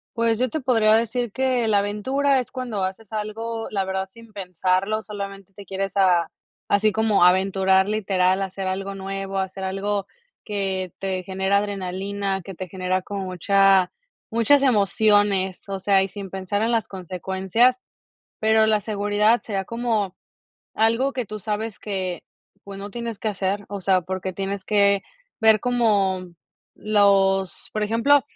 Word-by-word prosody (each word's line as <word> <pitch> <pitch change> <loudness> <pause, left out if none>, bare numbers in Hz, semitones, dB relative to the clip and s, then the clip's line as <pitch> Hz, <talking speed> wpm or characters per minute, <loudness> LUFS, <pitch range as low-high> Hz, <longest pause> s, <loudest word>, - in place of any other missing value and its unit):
Pues 230 -1 +2
yo 255 +1 +1
te 315 - -3
podría 225 -4 +3
decir 230 0 0
que 255 -1 0
la 205 -2 +4
aventura 260 +7 +1
es 250 - -5
cuando 240 -7 -3
haces 190 +3 -5
algo, 225 +1 -4
la 195 -2 0
verdad, 190 0 -3
sin 230 0 -15
pensarlo, 190 +2 -1
solamente 200 -1 -8
te 200 0 -11
quieres 195 +1 -3
a 175 -4 +4 0.4
así 210 +1 +3
como 215 -3 +3
aventurar, 190 +1 +3
literal, 195 -2 +1
hacer 190 0 -4
algo 195 +1 -3
nuevo, 195 0 -4
hacer 190 0 -4
algo 195 +1 -2 0.4
que 190 -3 -2
te 190 -1 -2
genera 190 +1 0
adrenalina, 195 0 -2
que 195 - -8
te 185 +1 -7
genera 185 0 -1
como 200 +1 -5
mucha 190 +1 +3 0.4
muchas 235 +5 +4
emociones, 205 -5 +2
o 195 -1 -4
sea, 195 0 +3
y 195 - -2
sin 200 -1 -8
pensar 195 +2 -3
en 230 +1 +1
las 225 -3 +1
consecuencias, 190 +6 0 0.6
pero 220 0 +4
la 215 -1 +2
seguridad 210 +2 +2
sería 195 -3 -3
como, 225 -5 -1 0.6
algo 230 +5 +2
que 250 -3 -2
tú 215 +2 -7
sabes 210 +1 -4
que, 190 -4 -4 0.4
pues, 200 -1 -9
no 200 - -6
tienes 235 -1 -5
que 220 - -3
hacer, 200 0 -2
o 200 -2 -5
sea, 185 -1 +3
porque 185 +1 -4
tienes 195 +1 -4
que 200 -1 +3 0.4
ver 220 -2 +5
como 205 -7 +1 0.5
los 195 -3 +2
por 215 - -2
ejemplo, 230 +7 +4
200 Hz, 155 wpm, -23 LUFS, 190-220 Hz, 0.6 s, ver